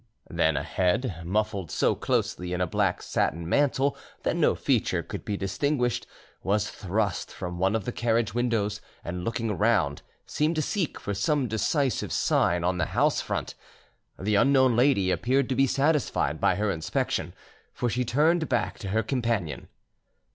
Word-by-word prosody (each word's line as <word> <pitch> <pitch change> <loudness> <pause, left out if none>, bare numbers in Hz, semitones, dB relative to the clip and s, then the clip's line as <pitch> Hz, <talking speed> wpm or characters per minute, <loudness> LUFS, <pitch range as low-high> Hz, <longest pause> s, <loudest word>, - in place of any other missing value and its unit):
Then - - +2
a - - -1
head, 95 0 0
muffled 95 -1 -1
so - - +2
closely 90 0 -1
in 90 - -2
a 90 - +2
black 80 - 0
satin 80 +4 -1
mantle 140 +5 +2 0.3
that - - 0
no - - +3
feature - - 0
could - - -7
be 100 - -3
distinguished, 125 +6 -1 0.3
was 105 +1 0
thrust 100 0 -2
from 90 -1 -6
one 95 +3 +2
of 110 -4 -2
the - - -2
carriage 115 -3 0
windows, 110 -4 0 0.2
and 90 +1 -4
looking 115 0 -2
around, 100 -9 +1 0.2
seemed 155 +3 0
to 155 - +1
seek 185 -4 -2
for 100 - -3
some 130 +7 +1
decisive 130 +5 0
sign 85 0 +2
on 90 0 0
the 85 - +2
house - - +3
front. - - -3 0.6
The 105 +3 -1
unknown 130 +2 +4
lady 120 -7 +3
appeared 125 +9 +1
to 130 - 0
be 135 +2 +4
satisfied 140 +3 +1
by - - +3
her 105 0 0
inspection, 80 -3 -2 0.4
for 120 - -2
she 125 +2 0
turned 155 +7 +2
back 120 - -1
to 100 - -6
her 110 +4 +1
companion. 115 - -2
110 Hz, 165 wpm, -27 LUFS, 95-130 Hz, 0.6 s, unknown